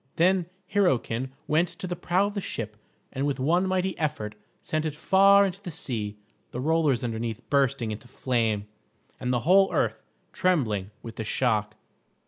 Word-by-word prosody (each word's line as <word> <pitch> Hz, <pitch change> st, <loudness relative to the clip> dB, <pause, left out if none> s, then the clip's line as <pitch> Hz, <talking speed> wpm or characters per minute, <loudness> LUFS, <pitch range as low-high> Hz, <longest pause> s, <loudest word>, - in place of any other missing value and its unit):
Then 180 Hz, 0 st, +3 dB, 0.3 s
Hyrroken 130 Hz, -, +1 dB, 0.2 s
went 160 Hz, +4 st, +2 dB
to 185 Hz, +4 st, -8 dB
the 175 Hz, -1 st, -3 dB
prow 180 Hz, +3 st, +1 dB
of 205 Hz, -, -3 dB
the 200 Hz, -, -2 dB
ship 110 Hz, -, -5 dB, 0.4 s
and 135 Hz, +1 st, -1 dB
with 140 Hz, -2 st, -1 dB
one 175 Hz, +8 st, +2 dB
mighty 185 Hz, 0 st, 0 dB
effort 110 Hz, -9 st, -2 dB, 0.3 s
sent 155 Hz, 0 st, -2 dB
it 155 Hz, -2 st, -3 dB
far 195 Hz, +4 st, +6 dB
into 195 Hz, 0 st, -4 dB
the 195 Hz, -, -6 dB
sea, 110 Hz, -10 st, -2 dB, 0.3 s
the 125 Hz, -, -6 dB
rollers 150 Hz, -3 st, +2 dB
underneath 115 Hz, 0 st, -3 dB
bursting 135 Hz, -5 st, +2 dB
into 105 Hz, +3 st, -7 dB
flame, 115 Hz, -5 st, 0 dB, 0.5 s
and 125 Hz, -1 st, -1 dB
the 120 Hz, -2 st, +1 dB
whole 190 Hz, +7 st, +5 dB
earth -, -, 0 dB, 0.3 s
trembling 115 Hz, -, +1 dB
with 115 Hz, -, -8 dB
the 110 Hz, -, -2 dB
shock. 105 Hz, -2 st, 0 dB
140 Hz, 165 wpm, -27 LUFS, 115-180 Hz, 0.5 s, far